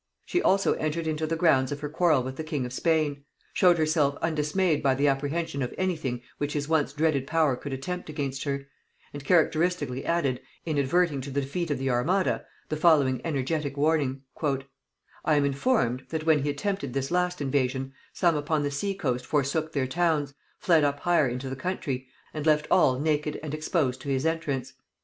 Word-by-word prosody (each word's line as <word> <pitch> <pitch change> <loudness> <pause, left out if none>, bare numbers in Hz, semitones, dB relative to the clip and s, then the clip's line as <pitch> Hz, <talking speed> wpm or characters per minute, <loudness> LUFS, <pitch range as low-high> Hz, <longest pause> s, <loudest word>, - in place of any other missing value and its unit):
She 360 - 0
also 195 +1 +3
entered 155 +2 -2
into 155 0 -1
the 165 - 0
grounds 150 -6 +3
of 145 0 -4
her 150 - -2
quarrel 155 -3 +2
with 130 +1 -5
the 160 - -5
king 150 -5 -2
of 125 - -6
Spain; 150 -2 +1 0.3
showed 180 -2 +5
herself 155 -3 +2
undismayed 160 +1 +1
by 135 -2 +3
the 140 +2 +2
apprehension 140 +2 -1
of 125 - -3
any 185 -1 +1
thing 125 -6 -4 0.2
which 145 0 -2
his 145 -1 -2
once 160 -3 +1
dreaded 145 -2 0
power 155 -4 +2
could 140 +3 -7
attempt 180 +7 -4
against 140 -3 -3
her; 140 -1 -2 0.5
and 145 -1 -7
characteristically 155 -4 +1
added, 140 -7 0 0.2
in 155 -3 0
adverting 145 +1 +2
to 135 - -6
the 140 +1 -1
defeat 165 +5 -3
of 145 - 0
the 135 0 -1
armada, 170 +11 +1 0.3
the 155 - -2
following 145 -6 +4
energetic 145 -1 -2
warning: 140 -3 +1 0.2
"I 140 +2 -3
am 145 -1 +3
informed, 140 - 0
that 160 -1 -3
when 155 -3 +4
he 145 - -1
attempted 145 -3 -2
this 135 +2 -2
last 180 0 +1
invasion, 135 -1 -1 0.2
some 170 -3 +2
upon 150 0 0
the 145 - -1
sea 195 +8 -2
coast 130 -9 -2
forsook 150 +2 0
their 140 -3 0
towns, 150 -1 0 0.2
fled 165 -4 +3
up 145 0 0
higher 175 -5 +3
into 125 +2 -4
the 130 - -4
country, 130 -4 -3 0.3
and 155 - -4
left 150 -1 +4
all 130 -1 +4
naked 150 0 0
and 150 -2 -5
exposed 155 -4 -1
to 140 - -6
his 135 +1 0
entrance. 140 -6 -1
145 Hz, 190 wpm, -27 LUFS, 135-160 Hz, 0.5 s, showed